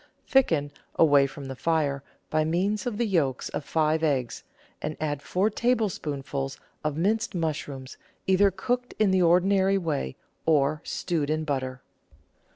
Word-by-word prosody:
Thicken, 160 Hz, -, +2 dB, 0.2 s
away 145 Hz, -3 st, +5 dB
from 140 Hz, +1 st, -9 dB
the 135 Hz, 0 st, -6 dB
fire, 145 Hz, -2 st, 0 dB, 0.3 s
by 155 Hz, 0 st, +2 dB
means 190 Hz, +7 st, 0 dB
of 225 Hz, -4 st, -2 dB
the 235 Hz, -, +1 dB
yolks 155 Hz, -, 0 dB
of -, -, -4 dB
five 155 Hz, +1 st, +1 dB
eggs, 135 Hz, -6 st, 0 dB, 0.4 s
and 155 Hz, 0 st, -3 dB
add 145 Hz, -2 st, -2 dB
four 185 Hz, +8 st, +1 dB
tablespoonfuls 150 Hz, -, -1 dB, 0.3 s
of 150 Hz, -1 st, -1 dB
minced 215 Hz, +5 st, 0 dB
mush 160 Hz, -3 st, -1 dB
rooms, 135 Hz, -2 st, -8 dB, 0.3 s
either 190 Hz, +1 st, +5 dB
cooked 245 Hz, +6 st, -2 dB
in 215 Hz, -3 st, +3 dB
the 190 Hz, -1 st, +3 dB
ordinary 190 Hz, +3 st, +4 dB
way 155 Hz, -, -2 dB, 0.3 s
or 150 Hz, -1 st, +3 dB
stewed 160 Hz, -5 st, -2 dB
in 155 Hz, 0 st, 0 dB
butter. 130 Hz, -3 st, -3 dB
160 Hz, 150 wpm, -27 LUFS, 140-190 Hz, 0.4 s, away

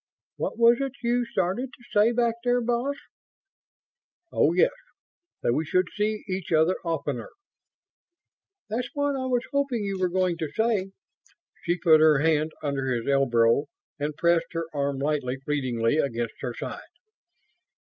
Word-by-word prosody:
"What -, -, -3 dB
was 235 Hz, 0 st, +6 dB
it 270 Hz, -2 st, -2 dB
you 240 Hz, +1 st, +1 dB
started 215 Hz, +3 st, -1 dB
to 240 Hz, -, -17 dB
say 215 Hz, +2 st, +5 dB
back 235 Hz, -1 st, +2 dB
there, 245 Hz, 0 st, +2 dB
boss?" 245 Hz, +4 st, -1 dB, 1.4 s
"Oh, -, -, +3 dB
yes. -, -, +4 dB, 0.7 s
That 120 Hz, -, +2 dB
we 155 Hz, -, 0 dB
should 185 Hz, +3 st, +1 dB
see 210 Hz, +1 st, -1 dB
each 185 Hz, -2 st, -4 dB
other 160 Hz, +3 st, +4 dB
oftener." 165 Hz, -, -3 dB, 1.4 s
"That's 240 Hz, +3 st, -3 dB
what 285 Hz, -1 st, 0 dB
I 260 Hz, -1 st, -2 dB
was 250 Hz, -1 st, 0 dB
hoping 275 Hz, -6 st, 0 dB
you 195 Hz, -1 st, -3 dB
were 185 Hz, -1 st, +1 dB
going 180 Hz, -1 st, 0 dB
to 160 Hz, -, -2 dB
say." 220 Hz, -4 st, +1 dB, 0.8 s
She 175 Hz, +1 st, +1 dB
put 160 Hz, -3 st, +5 dB
her 155 Hz, -2 st, +6 dB
hand 155 Hz, +1 st, +2 dB
under 135 Hz, -2 st, -1 dB
his 120 Hz, -2 st, -2 dB
elbow 130 Hz, -1 st, +3 dB, 0.3 s
and 145 Hz, +1 st, -3 dB
pressed 170 Hz, -1 st, +2 dB
his 165 Hz, 0 st, -1 dB
arm 140 Hz, -1 st, -1 dB
lightly, 140 Hz, -2 st, -1 dB
fleetingly, 130 Hz, -3 st, 0 dB
against 120 Hz, -5 st, -1 dB
her 125 Hz, -3 st, -4 dB
side. -, -, -6 dB
175 Hz, 150 wpm, -26 LUFS, 145-235 Hz, 1.4 s, was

